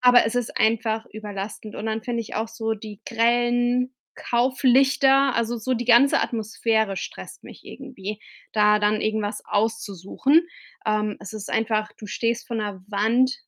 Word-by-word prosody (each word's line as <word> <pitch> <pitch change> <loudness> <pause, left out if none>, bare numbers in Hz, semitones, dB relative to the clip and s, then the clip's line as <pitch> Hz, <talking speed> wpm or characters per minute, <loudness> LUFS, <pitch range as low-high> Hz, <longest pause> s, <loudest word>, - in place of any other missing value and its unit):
aber 250 -1 +6
es 225 - -2
ist 245 -2 -2
einfach 220 0 +1
überlastend 210 0 -7
und 215 - -5
dann 220 0 -2
finde 235 -1 -2
ich 220 - -10
auch 220 +1 -1
so 225 0 -2
die 210 -1 -10
grellen 240 +2 +2 0.2
Kauflichter 265 +2 +3
also, 235 +1 0
so 255 +3 -1
die 240 +1 -3
ganze 245 +4 +5
Atmosphäre 220 -2 0
stresst - - -8
mich - - -13
irgendwie, 215 -6 -8 0.3
da 210 0 +4
dann 210 +1 +2
irgendwas 215 -1 -2
auszusuchen. 220 - +1 0.4
Ähm, 215 -1 0
es 200 - -9
ist 210 -1 -6
einfach 215 -1 0
du 210 - -9
stehst 235 +2 -2
vor 235 - -4
'ner 205 -3 -4
Wand 230 +6 +2
225 Hz, 155 wpm, -24 LUFS, 215-245 Hz, 0.4 s, aber